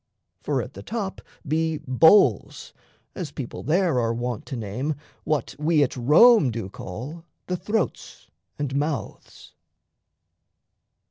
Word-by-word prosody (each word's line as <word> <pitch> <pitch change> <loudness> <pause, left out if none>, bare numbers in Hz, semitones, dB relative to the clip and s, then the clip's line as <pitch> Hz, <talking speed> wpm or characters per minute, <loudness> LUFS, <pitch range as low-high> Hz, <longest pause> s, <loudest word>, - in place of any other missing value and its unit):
For - - -1
at - - -10
the - - -9
top 210 -4 -4 0.3
be 160 +1 0
"bowls," 160 +10 +4 0.4
as 170 -7 -6
people 135 -4 -6
there 165 -1 +1
Are 115 -1 0
wont 120 -2 -4
to - - -5
name 120 +7 -3 0.3
what 150 -5 -1
we 155 -1 +3
at 130 - -2
Rome 150 - +6
do 115 -4 -5
call 125 - -8 0.2
The 180 - -2
throats 200 +3 -3 0.3
and 140 -2 -3
mouths. 145 +1 -4
150 Hz, 125 wpm, -24 LUFS, 125-170 Hz, 0.4 s, Rome